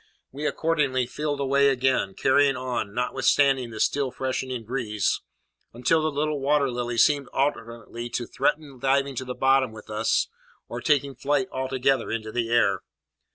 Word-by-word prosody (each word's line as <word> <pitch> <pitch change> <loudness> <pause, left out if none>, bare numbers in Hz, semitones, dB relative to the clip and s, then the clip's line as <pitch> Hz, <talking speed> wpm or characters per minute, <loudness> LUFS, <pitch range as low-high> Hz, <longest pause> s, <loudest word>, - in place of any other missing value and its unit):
We 145 +3 -3
accordingly 145 -7 0
filled 145 +3 -3
away 140 0 +3
again, 130 -7 +1
carrying 140 0 +3
on, 125 -5 -3
notwithstanding 130 +1 +2
the 110 -1 -8
still 140 -2 +1
freshening 130 -1 -3
breeze, 110 -4 -1 0.5
until 125 +7 +2
the 155 - +1
little 150 0 -1
Water 140 -1 +2
Lily 120 -1 -3
seemed 140 +3 +3
alternately 120 -3 -3
to 120 0 -3
threaten 145 +1 -2
diving 135 +1 +1
to 130 - -3
the 125 0 -5
bottom 135 -2 +3
with 110 0 -11
us 110 +1 +1 0.4
or 120 +1 -6
taking 140 -1 +1
flight 140 -1 0
altogether 130 -1 0
into 110 -1 -3
the 115 0 -1
air. 100 -5 +2
130 Hz, 155 wpm, -25 LUFS, 120-140 Hz, 0.5 s, away